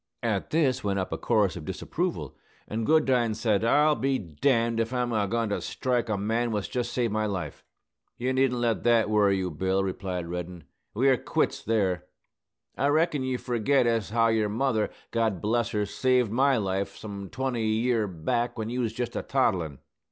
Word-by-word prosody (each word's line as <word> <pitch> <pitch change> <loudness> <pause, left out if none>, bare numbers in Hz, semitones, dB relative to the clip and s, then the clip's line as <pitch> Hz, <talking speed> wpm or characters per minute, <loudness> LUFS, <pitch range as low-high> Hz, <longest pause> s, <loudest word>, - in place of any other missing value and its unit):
At - - -1
this 135 -5 +1
went 100 -1 0
up 95 - -2
a - - -2
chorus 105 -4 +2
of 85 - -7
disapproval: - - -3 0.3
and 110 +1 -3
Goodine 130 -8 +3
said, 110 -2 +1
"I'll 150 +6 +4
be 135 -2 0
d 85 - -11
d 115 -4 +2
if 115 +1 -2
I'm 125 -1 0
a 105 -2 +1
goin 115 +1 -1
to 100 - -1
strike 125 -3 -1
the 110 -2 -1
man 115 +4 0
what's 105 -3 -2
jest 125 -1 -2
saved 120 -4 0
my 110 0 0
life!" 90 -7 -5 0.5
"You 130 +2 -1
needn't 130 -2 +2
let 120 -2 +1
that 115 -3 +3
worry 100 -2 +4
you, 90 -2 -2
Bill," 95 +5 0
replied 95 -2 -3
Reddin. 90 0 -6 0.3
"We're 130 +3 +4
quits - - -1
there. 95 -5 0 0.7
I 140 - +1
reckon 155 0 +2
you 130 -1 -1
forget 125 +2 +1
as 115 -3 0
how 115 +1 +3
your 110 -2 +1
mother, 110 0 0 0.2
God 110 -5 0
bless 115 +3 0
her, 105 -1 -1
saved 125 +2 +1
my 135 +3 +3
life, 100 -2 -2
some 100 -3 -7
twenty 130 -4 -2
year 110 0 +1
back, 120 +8 -2
when 110 0 -3
you 125 +1 -1
was 115 -2 -1
jest 120 0 -4
a - - -1
toddlin'. 90 - 0
115 Hz, 190 wpm, -27 LUFS, 100-125 Hz, 0.7 s, I'll